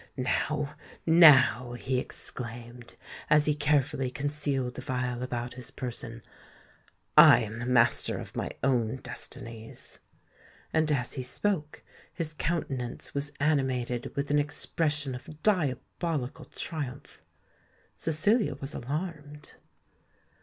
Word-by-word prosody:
Now—now," 145 -2 +4
he 130 +1 -1
exclaimed, 120 -1 -5 0.3
as 150 -1 +5
he 150 - +3
carefully 145 -3 +1
concealed 140 -1 -1
the 130 - -7
phial 125 -2 -2
about 125 -1 -3
his 125 0 -7
person, 120 -3 -6 0.9
"I 120 - +9
am 110 +1 -5
the 120 - -4
master 125 -2 +3
of - - -8
my - - -2
own 125 -4 +2
destinies!" 115 -3 -7 0.7
And, 160 -1 +2
as 125 -4 0
he 130 - -3
spoke, 150 +4 -2 0.3
his 160 -2 -3
countenance 135 -7 -3
was 145 +1 0
animated 130 -5 0
with 140 +1 -2
an 145 - +4
expression 145 -1 +1
of 150 +5 -10
diabolical 155 - 0
triumph. 140 -3 -6 0.7
Cecilia 165 - +2
was 140 +1 -4
alarmed. 150 +1 -5
135 Hz, 110 wpm, -29 LUFS, 125-150 Hz, 0.9 s, I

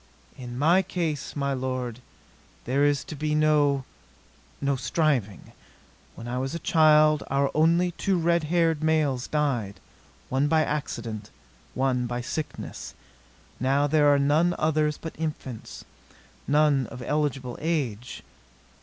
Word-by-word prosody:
"In 120 -1 -8
my 165 +7 +4
case, 170 -6 -3
my 140 -1 -1
lord, 130 -2 -3 0.7
there 135 +3 +1
is 145 -1 +2
to - - -8
be 150 +1 -1
no 145 -3 +2 0.7
no 140 0 0
striving. 130 - -1 0.6
When 115 - -9
I 125 +1 -2
was 135 +4 -3
a 170 - -7
child 155 -2 +5
our 140 +1 +1
only 170 +3 +3
two 190 +2 0
red 170 -1 +1
haired 165 -1 +1
males 155 -5 +1
died, 130 -10 -1 0.5
one 135 +3 +1
by 160 +1 +3
accident, 115 -8 -4 0.5
one 130 -2 0
by 120 0 -3
sickness. 150 +5 -6 0.6
Now 135 +2 +2
there 145 0 +4
are 145 - +4
none 150 +5 +2
others 155 -1 +1
but 165 - -7
infants, 145 -7 -6 0.6
none 145 -3 +3
of 125 +1 -9
eligible 135 -4 -1
age. 130 -8 -3
145 Hz, 130 wpm, -26 LUFS, 130-155 Hz, 0.7 s, child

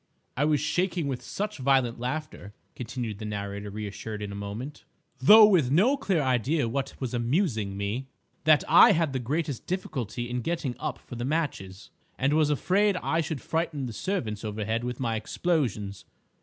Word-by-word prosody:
"I 145 - +1
was 150 -1 +2
shaking 175 +1 0
with 130 -3 -3
such 210 -4 -4
violent 130 -3 +2
laughter," 125 -5 -5 0.2
continued 120 -3 -5
the 110 - -5
narrator, 100 -1 -4
reassured 105 +1 -6
in 100 - -5
a - - -6
moment, 105 +8 -6 0.4
"though 215 +11 +9
with 180 -11 +4
no 200 - +4
clear 195 - 0
idea 130 +2 +1
what 135 +3 -3
was 130 -3 -4
amusing 120 - 0
me, 105 +7 -3 0.4
that 155 -1 +5
I - - +8
had 160 -5 0
the 130 - -1
greatest 140 +2 -3
difficulty 125 - -3
in 125 +1 -3
getting 150 -3 -2
up 150 -4 -3
for - - -13
the 120 - -3
matches, 125 - -3 0.3
and 135 +2 +1
was 155 -1 +3
afraid 190 +7 +2
I 165 -2 0
should 155 -4 -4
frighten 160 -3 -2
the 120 - -5
servants 115 - -3
overhead 110 +2 -2
with 125 0 -4
my 115 -3 -1
explosions. 110 - -2
130 Hz, 170 wpm, -27 LUFS, 110-160 Hz, 0.4 s, though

